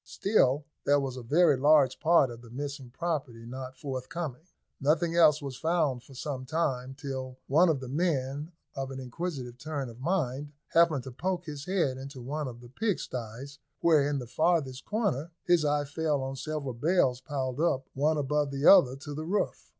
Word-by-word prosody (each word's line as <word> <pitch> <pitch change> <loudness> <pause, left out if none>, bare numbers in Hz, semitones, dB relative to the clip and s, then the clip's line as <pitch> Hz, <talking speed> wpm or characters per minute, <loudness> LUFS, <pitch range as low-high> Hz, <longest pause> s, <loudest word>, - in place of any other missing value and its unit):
Still 145 -9 +2 0.2
there 145 0 +4
was 135 -2 -3
a 130 - -6
very 150 +6 +4
large 140 -1 +4
part 160 -6 +4
of 120 0 -10
the 120 - -14
missing 140 +1 -6
property 135 -6 -3
not 130 +1 -7
forthcoming. 140 +3 -5 0.3
Nothing 165 +4 +2
else 155 -3 +5
was 135 -3 -5
found 155 -5 +1
for 135 - -16
some 130 0 -4
time, 135 -3 -1
till 130 -2 -5
one 165 +6 +4
of 145 -5 +1
the 130 - -6
men, 145 0 -1 0.2
of 135 -1 -3
an 135 0 -6
inquisitive 130 -2 -5
turn 145 -3 -4
of 115 +1 -12
mind, 145 -3 -1 0.2
happened 165 -6 +4
to 130 - -7
poke 180 +7 -2
his 145 -3 -6
head 170 -9 +1
into 135 0 -8
one 145 +4 -3
of 120 -1 -8
the 120 - -13
pigsties, 135 - -4 0.2
where, 155 -4 +4
in 145 - 0
the 125 - -4
farthest 140 -1 0
corner, 200 - -1
his 175 -3 +3
eye 145 0 +1
fell 145 -1 -1
on 135 0 -4
several 140 -1 -4
bales 130 -1 +2
piled 135 -2 -3
up 135 -5 +1
one 150 +3 +2
above 145 0 0
the 140 +1 -3
other 150 -10 +8
to 145 +2 -8
the 155 +2 -5
roof. 200 +3 -1
140 Hz, 185 wpm, -29 LUFS, 130-160 Hz, 0.3 s, other